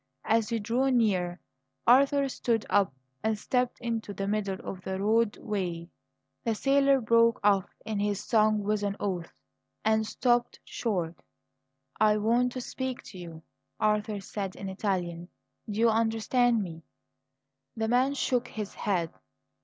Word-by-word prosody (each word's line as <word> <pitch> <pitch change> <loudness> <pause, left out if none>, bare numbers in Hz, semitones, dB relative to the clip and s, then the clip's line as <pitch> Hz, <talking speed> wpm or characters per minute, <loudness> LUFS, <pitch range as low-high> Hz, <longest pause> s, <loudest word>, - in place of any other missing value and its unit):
As 225 0 +2
he 230 - 0
drew 235 +5 +1
near, 190 -8 +1 0.5
Arthur 275 +3 +5
stood 235 -4 -1
up 200 -5 +3 0.3
and 220 0 +1
stepped 250 +3 -1
into 225 -4 -3
the 195 - -3
middle 200 -2 -1
of 185 - -6
the 190 +1 -4
roadway. 205 -5 0 0.5
The 230 -2 0
sailor 275 +2 +4
broke 230 -1 +4
off 200 -2 +3 0.2
in 215 -2 -2
his 205 -1 0
song 215 -2 +3
with 210 0 0
an 200 -1 -1
oath, 180 -4 -3 0.5
and 220 0 +2
stopped 240 0 +1
short. 180 -8 -3 0.8
"I 215 -1 +4
want 235 +4 +2
to 255 - -4
speak 260 0 -4
to 185 - -9
you," 165 -2 -9 0.4
Arthur 210 0 +1
said 195 -1 -5
in 195 - -6
Italian. 180 -3 -2 0.4
"Do 210 +1 -3
you 230 0 +5
understand 225 +1 +2
me?" 165 -3 -8 1.0
The 220 0 0
man 255 +4 +2
shook 250 -3 0
his 210 -2 -6
head. 180 -6 -1
215 Hz, 145 wpm, -28 LUFS, 195-235 Hz, 1.0 s, Arthur